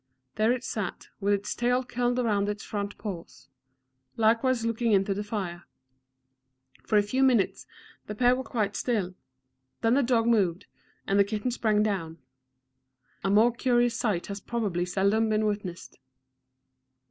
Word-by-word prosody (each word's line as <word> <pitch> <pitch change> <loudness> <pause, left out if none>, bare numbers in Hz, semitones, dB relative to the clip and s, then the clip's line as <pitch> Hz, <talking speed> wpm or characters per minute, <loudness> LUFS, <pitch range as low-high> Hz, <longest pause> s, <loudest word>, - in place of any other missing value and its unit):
There 215 +2 +2
it 250 0 -1
sat, 210 -7 -4
with 200 0 +1
its 200 0 -4
tail 245 +1 +1
curled 245 0 -1
round 205 -5 +1
its 210 +1 -4
front 205 -1 -4
paws, 185 -6 -8 0.7
likewise 230 +2 +2
looking 230 0 +1
into 195 0 +2
the 205 +2 -3
fire. 190 -5 -5 1.2
For 215 - +3
a 205 - +5
few 255 +6 -1
minutes 250 -7 +2 0.4
the 210 - -5
pair 245 +3 +4
were 260 - -3
quite 210 -4 -2
still; 205 -7 -1 0.7
then 225 0 +3
the 280 - +4
dog 235 -3 +2
moved, 195 -7 +2 0.4
and 200 +1 +2
the - - +7
kitten 215 +4 -2
sprang 215 -3 +2
down. 175 -6 -2 1.1
A 195 - 0
more 215 +4 +5
curious 240 -1 +1
sight 210 -8 -1
has 200 0 -6
probably 200 -8 -2
seldom 200 +4 +1
been 215 0 +1
witnessed. 200 -9 -4
215 Hz, 150 wpm, -27 LUFS, 200-240 Hz, 1.2 s, the